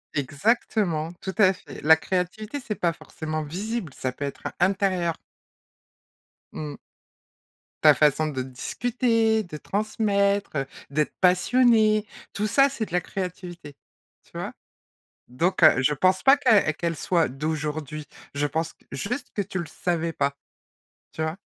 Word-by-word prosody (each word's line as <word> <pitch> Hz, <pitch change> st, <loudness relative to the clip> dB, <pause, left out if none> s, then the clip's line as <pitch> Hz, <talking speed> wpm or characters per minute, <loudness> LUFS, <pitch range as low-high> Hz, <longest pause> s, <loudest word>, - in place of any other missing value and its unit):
Exactement, 160 Hz, -, 0 dB
tout 190 Hz, -, -5 dB
à 190 Hz, -3 st, +6 dB
fait. 155 Hz, -6 st, -11 dB
La 160 Hz, +1 st, +8 dB
créativité, 190 Hz, -, -3 dB
c'est 215 Hz, -, -2 dB
pas 170 Hz, -3 st, 0 dB
forcément 155 Hz, 0 st, -5 dB
visible, 185 Hz, -, -4 dB
ça 130 Hz, -, -3 dB
peut 140 Hz, +3 st, -5 dB
être 140 Hz, -, -7 dB, 0.2 s
intérieur. 185 Hz, -2 st, +1 dB, 1.4 s
Mmh. 150 Hz, -2 st, -6 dB, 1.1 s
Ta -, -, +9 dB
façon 150 Hz, +1 st, +3 dB
de 135 Hz, -4 st, -3 dB
disputer, 225 Hz, -, 0 dB
de 175 Hz, -4 st, -9 dB
transmettre, 200 Hz, +1 st, 0 dB
heu, 135 Hz, -, 0 dB, 0.2 s
d'être 150 Hz, +1 st, 0 dB
passionnée, 215 Hz, +3 st, +4 dB, 0.3 s
tout 210 Hz, -, -1 dB
ça, 275 Hz, +6 st, +5 dB
c'est 235 Hz, -5 st, -3 dB
de -, -, -13 dB
la 180 Hz, -, +3 dB
créativité. 175 Hz, -5 st, -6 dB, 0.5 s
Tu -, -, -27 dB
vois? -, -, -4 dB, 0.8 s
Donc 165 Hz, +9 st, -1 dB
heu, 155 Hz, -4 st, +7 dB
je 150 Hz, +3 st, +3 dB
pense 185 Hz, +5 st, +2 dB
pas 270 Hz, +1 st, +7 dB
que 225 Hz, -, +4 dB
qu'elle 170 Hz, +1 st, -2 dB
soit 170 Hz, 0 st, +1 dB
d'aujourd'hui, 150 Hz, +1 st, -4 dB, 0.3 s
je 145 Hz, +1 st, +1 dB
pense 160 Hz, +3 st, -2 dB, 0.2 s
juste 245 Hz, +7 st, -3 dB
que 205 Hz, -, 0 dB
tu 190 Hz, -1 st, -5 dB
le 170 Hz, -, -3 dB
savais 170 Hz, -1 st, -2 dB
pas. 140 Hz, -1 st, -1 dB, 0.8 s
Tu 160 Hz, -, -5 dB
vois? 160 Hz, +3 st, -2 dB
175 Hz, 140 wpm, -25 LUFS, 155-210 Hz, 1.4 s, Ta